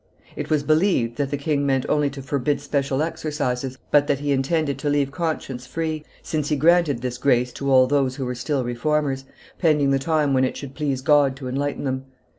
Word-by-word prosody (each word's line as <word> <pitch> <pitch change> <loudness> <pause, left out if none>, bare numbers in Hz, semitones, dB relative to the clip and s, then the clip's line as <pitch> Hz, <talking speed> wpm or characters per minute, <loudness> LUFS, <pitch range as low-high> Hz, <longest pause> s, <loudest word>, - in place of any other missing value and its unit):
It - - -5
was 150 -2 +2
believed 155 - +2
that 140 -2 -1
the 145 - -2
king 145 0 0
meant 135 -2 +1
only 150 -1 +2
to 140 -1 -8
forbid 140 +1 0
special 140 0 -1
exercises, 145 -6 -3
but 145 -1 +4
that 140 - +2
he 145 +1 -2
intended 140 +1 0
to 145 - -1
leave 145 -1 +1
conscience 145 -6 -3
free, 155 +1 -3 0.2
since 150 -2 -2
he 150 - +2
granted 155 -4 +3
this 125 -1 -3
grace 125 -2 +2
to 140 0 -2
all 130 -1 +7
those 135 -1 +1
who 135 -2 -4
were 125 - -2
still 130 +2 -1
Reformers, 135 +2 -1 0.3
pending 150 -5 +3
the 135 - +2
time 150 -1 +1
when 130 0 +3
it 130 - -1
should 140 -2 -8
please 140 -3 -2
God 145 -2 +4
to 130 -1 -7
enlighten 140 +3 -2
them. 130 -1 -2
140 Hz, 210 wpm, -23 LUFS, 130-150 Hz, 0.3 s, all